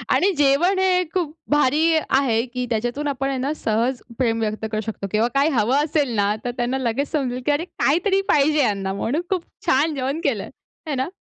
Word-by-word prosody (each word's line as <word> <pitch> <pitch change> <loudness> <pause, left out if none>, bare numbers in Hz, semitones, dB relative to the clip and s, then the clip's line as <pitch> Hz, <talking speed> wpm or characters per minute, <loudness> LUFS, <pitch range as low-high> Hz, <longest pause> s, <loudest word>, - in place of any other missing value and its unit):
आणि 395 +2 +3
जेवण 300 +7 +3
हे 365 -1 +3
खूप 335 -5 -1 0.2
भारी 295 +1 +3 0.3
आहे, 255 -4 +2
की 250 0 -4
त्याच्यातून 245 +6 -2
आपण 270 -1 -1
हे 270 - -2
ना 275 +4 -1
सहज 235 +3 -1 0.2
प्रेम 230 -3 +1
व्यक्त 215 0 -2
करू 215 0 -1
शकतो 205 -3 -5
किंवा 220 +2 +2
काय 280 +3 +4
हवं 255 +7 +2
असेल 290 -5 0
ना, 205 +1 +2
तर 245 - -1
त्यांना 245 +2 0
लगेच 260 +3 -1
समजेल, 255 -5 -1
की 295 - +3
अरे 305 +4 0
काहीतरी 375 +5 +1
पाहिजे 300 +1 +3
ह्यांना 195 -5 0
म्हणून 250 - -1
खूप 365 -3 -1 0.2
छान 295 +4 +2
जेवण 270 +4 -2
केलंय, - - -1 0.4
है 290 - -1
ना? 260 +3 -1
270 Hz, 200 wpm, -22 LUFS, 235-300 Hz, 0.4 s, काय